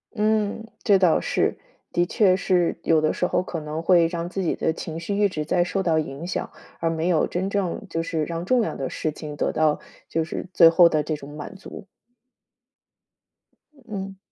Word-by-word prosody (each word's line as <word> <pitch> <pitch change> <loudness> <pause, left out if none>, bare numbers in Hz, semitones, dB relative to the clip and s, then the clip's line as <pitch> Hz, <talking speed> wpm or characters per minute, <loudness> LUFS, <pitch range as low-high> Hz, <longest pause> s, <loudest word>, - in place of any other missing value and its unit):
嗯， 215 0 0 0.2
这 200 -3 +5
倒 180 -4 +4
是。 - - 0 0.4
的 175 - +2
确 185 0 +3
是 180 -3 +1
有 160 -1 +3
的 155 - +2
时 - - 0
候 - - +1
可 180 -2 -5
能 155 +1 -4
会 170 0 +5
让 170 0 -4
自 190 +1 -3
己 170 - +1
的 - - 0
情 160 0 -6
绪 200 +5 -3
一 205 0 +4
直 155 -5 -4
在 175 +2 +2
受 190 +2 -1
到 165 -4 +2
影 155 +1 -3
响， 185 - -3 0.3
而 165 - 0
没 165 +1 -1
有 175 -3 +3
真 185 +2 -2
正 200 0 -2
就 165 0 -2
是 160 -1 -2
让 170 +1 -4
重 250 +5 +3
要 220 - -2
的 135 - -3
事 155 - -2
情 150 -1 -8
得 - - 0
到 155 -1 +2 0.3
就 165 - -1
是 160 - -5
最 165 -2 +8
后 170 +1 +6
的 155 - +1
这 155 +1 -2
种 145 0 -10
满 150 +6 -8
足。 195 +1 -10 2.0
嗯。 195 -3 -6
170 Hz, 220 characters per minute, -24 LUFS, 160-190 Hz, 2.0 s, 最